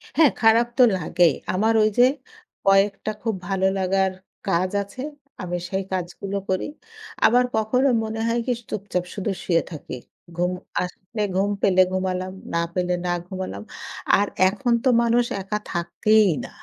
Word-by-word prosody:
হ্যাঁ, 310 -4 +6
খারাপ 230 +1 +5
তো 255 - +7
লাগেই। 170 -1 +3 0.2
আমার 220 +5 +2
ওই 215 - +4
যে - - +9 0.6
কয়েকটা 195 +2 +3
খুব 225 -2 -1
ভালো 190 0 0
লাগার 190 0 +1 0.4
কাজ 185 0 +1
আছে, 200 +6 -10 0.4
আমি 175 -1 -3
সেই 190 +1 -1
কাজগুলো 190 +2 -3
করি। 185 0 0 0.6
আবার 245 +2 +5
কখনো 220 +5 +2 0.2
মনে 220 0 -4
হয় 235 +1 +1
কি 250 - +2 0.2
চুপচাপ 190 -3 -2
শুধু 200 +1 -2
শুয়ে 170 -2 +2
থাকি। 150 -5 -7 0.4
ঘুম 180 +1 0 0.3
আসলে 185 +4 -5
ঘুম 195 +2 +2
পেলে 185 -1 +4
ঘুমালাম, 185 0 -2 0.2
না 170 - +2
পেলে 180 0 0
না 175 - 0 0.2
ঘুমালাম। 190 +2 -5 0.5
আর 205 0 +1 0.2
এখন 235 +5 0
তো 260 - +4
মানুষ 235 +1 +3 0.2
একা 195 +2 -2
থাকেই 210 +5 +3 0.2
না। - - -9
195 Hz, 150 wpm, -23 LUFS, 185-220 Hz, 0.6 s, যে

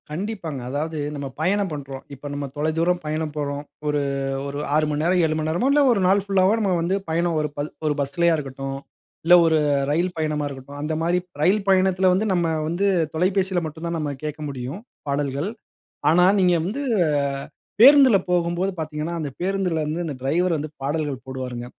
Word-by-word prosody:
கண்டிப்பாங்க. 170 -3 -4
அதாவது 155 +4 -3 0.2
நம்ம 140 -1 -4
பயணம் 195 +2 +1
பண்ணுறோம். 135 -2 -7
இப்ப, 140 +1 -12
நம்ம 145 0 -3
தொலை 155 +2 +1
தூரம் 175 +2 +1
பயணம் 155 0 -2
போறோம். 145 -1 -3 0.2
ஒரு 150 -1 +1 0.5
ஒரு 140 +1 -4 0.2
6 155 0 +3
மணி 150 0 -1
நேரம், 180 +2 +3
7 155 0 0
மணி 155 0 -1
நேரமோ, 175 +12 +1
இல்ல 290 +1 +4
ஒரு 225 - +2
நாள் 195 +1 +3
புல்லாவோ, 195 0 +3
நம்ம 200 -3 +1
வந்து 175 +3 0
பயணம், 170 +1 +1
ஒரு 150 - -2
ப - - -5 0.3
ஒரு 150 - +2
பஸ்லேயா 165 +5 +2
இருக்கட்டும், 135 -1 -5 0.5
இல்ல, 175 - +6
ஒரு 160 -1 +3 0.3
ரயில் 175 +4 0
பயணமா 155 -2 -1
இருக்கட்டும், 140 +1 -9
அந்த 155 +2 -2
மாரி 170 +2 +2 0.2
ரயில் 195 +5 +3
பயணத்தில 190 0 +4
வந்து, 195 +4 +1
நம்ம 175 -2 +1 0.2
வந்து 175 +5 0 0.3
தொலைபேசியில 185 +1 +1
மட்டும் 160 +2 -7
தான், 170 0 -2
நம்ம 150 -2 -2
கேட்க 150 0 -5
முடியும், 135 +7 -6 0.3
பாடல்கள். 140 +4 -1 0.6
ஆனா, 180 +2 +5
நீங்க 180 -2 +4
வந்து 240 +10 -3 1.0
பேருந்தில 265 -4 +8
போகும்போது 175 +2 +1
பார்த்தீங்கன்னா, 155 +1 -3
அந்த 150 -3 -3
பேருந்திலருந்து 175 -4 -1
அந்த 150 -4 -4
டிரைவரு 170 +7 +1
வந்து 155 +1 -4
பாடல்கள் 145 -2 -2
போடுவாருங்க. 130 -2 -5
160 Hz, 175 wpm, -23 LUFS, 145-185 Hz, 1.0 s, பேருந்தில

